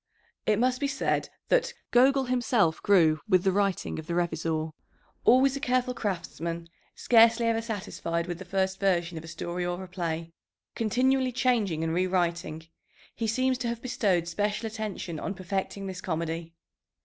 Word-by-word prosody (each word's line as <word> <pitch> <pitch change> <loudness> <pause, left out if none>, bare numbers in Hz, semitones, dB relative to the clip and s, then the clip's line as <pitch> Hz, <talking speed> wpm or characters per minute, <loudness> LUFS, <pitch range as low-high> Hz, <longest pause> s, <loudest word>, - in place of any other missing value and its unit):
It 215 -1 +4
must 250 +2 +2
be 285 - 0
said 280 - -1 0.2
that - - +2 0.2
"Gogol 265 +2 +5
himself 240 -9 +1
grew 160 -6 +4
with 185 -2 +4
the 190 - +3
writing 195 -4 0
of 160 - -9
the 170 - -2
Revizor." 160 -2 -1 0.5
Always 265 +2 +5
a - - -3
careful 255 -2 +1
craftsman, 170 -5 -4 0.3
scarcely 230 0 +5
ever 225 0 +2
satisfied 190 -6 -3
with 175 -1 -5
the - - -6
first 190 +1 -1
version 175 -3 +1
of - - -12
a - - -10
story 175 +2 -4
or 175 +1 -3
a - - -8
play, 165 -2 -4 0.4
continually 255 +3 +2
changing 225 -10 +1
and 165 0 -1
rewriting, 175 -3 0 0.5
he 230 - -2
seems 255 +3 +1
to 250 - -2
have 235 0 -2
bestowed 200 -9 0
special 205 +5 -1
attention 215 -7 -4
on 200 - -4
perfecting 190 +1 -3
this 185 -1 -6
comedy. 165 -1 -3
190 Hz, 160 wpm, -28 LUFS, 170-235 Hz, 0.5 s, Gogol